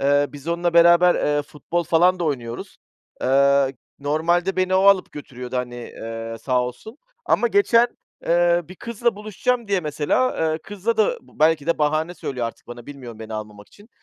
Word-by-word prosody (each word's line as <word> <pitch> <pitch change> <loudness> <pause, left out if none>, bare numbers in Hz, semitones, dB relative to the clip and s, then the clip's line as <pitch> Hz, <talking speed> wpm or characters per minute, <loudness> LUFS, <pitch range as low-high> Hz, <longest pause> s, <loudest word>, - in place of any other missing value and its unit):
eee, 145 +1 +3
biz 145 +2 -10
onunla 170 0 0
beraber, 170 +1 +6
eee, 145 0 0
futbol 165 +4 -4
falan 180 +3 +3
da 170 - -2
oynuyoruz. 120 -6 -4 0.5
Eee, 140 0 +3 0.2
normalde 170 +6 0
beni 185 0 +1
o - - +5
alıp 195 -1 +4
götürüyordu, 125 -3 -7
hani, 125 -1 -3
eee, 115 -1 -7
sağ 125 -2 +1
olsun. 170 - -8 0.3
Ama - - +2
geçen, 245 - +4 0.4
eee, 175 0 +3
bir 185 - -10
kızla 235 +1 -2
buluşacağım 215 +2 -2
diye 195 -2 +1
mesela, 155 - 0 0.2
eee, 155 - -2
kızla 205 +5 -3
da 220 - +5 0.2
-b - - -23
belki 155 -1 +3
de 170 - +1
bahane 155 +3 0
söylüyor 125 -8 -4
artık 115 - -10
bana, 120 0 -10
bilmiyorum 125 -6 -10
beni 110 0 -7
almamak 105 -1 -8
için 205 +2 -19
155 Hz, 175 wpm, -22 LUFS, 130-185 Hz, 0.5 s, beraber